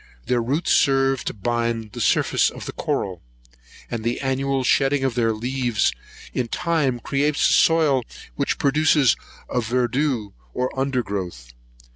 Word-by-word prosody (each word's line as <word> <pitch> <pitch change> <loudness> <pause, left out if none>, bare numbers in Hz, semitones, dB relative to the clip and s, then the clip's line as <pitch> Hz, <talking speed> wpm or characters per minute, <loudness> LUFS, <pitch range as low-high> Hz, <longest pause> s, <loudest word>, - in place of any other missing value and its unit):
Their 125 -1 +1
roots 140 +9 -1
serve 135 -1 +3
to - - -2
bind 115 0 -2
the - - -6
surface - - +3
of - - -9
the - - -4
coral; 95 -4 -3 0.7
and 115 -2 -3
the 120 +1 -1
annual 135 0 0
shedding 135 +2 +2
of 135 -2 +1
their 115 -1 +1
leaves, 120 0 0 0.4
in 125 - -1
time 145 -3 0
creates 145 +4 +1
a - - +3
soil 155 -5 +4 0.3
which - - -1
produces 145 -2 +3 0.3
a 125 - -1
verdure 125 -1 0 0.2
or 125 0 -1
undergrowth. 100 - -3
125 Hz, 140 wpm, -22 LUFS, 115-135 Hz, 0.7 s, soil